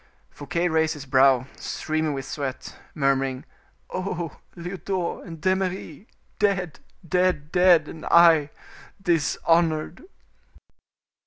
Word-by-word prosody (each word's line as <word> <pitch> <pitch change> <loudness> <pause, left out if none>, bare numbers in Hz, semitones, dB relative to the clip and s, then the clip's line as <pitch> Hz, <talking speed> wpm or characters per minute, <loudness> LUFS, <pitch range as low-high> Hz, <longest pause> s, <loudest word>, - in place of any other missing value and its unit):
Fouquet 170 +4 -2
raised 160 -1 +1
his 145 -1 -9
brow, 130 -1 +4
streaming 155 -1 -2
with 135 -1 -5
sweat, 135 -1 -5 0.2
murmuring, 135 -1 0 0.5
"Oh! 180 -4 -4 0.2
Lyodot 180 0 -4
and 165 -2 -9
D'Eymeris! 185 0 -2 0.3
dead! 190 -6 0 0.3
dead! 180 -4 +1
dead! 180 -4 +5
and 160 - -9
I 165 -4 +6 0.5
dishonored." 165 - +1
165 Hz, 95 wpm, -24 LUFS, 145-180 Hz, 0.5 s, I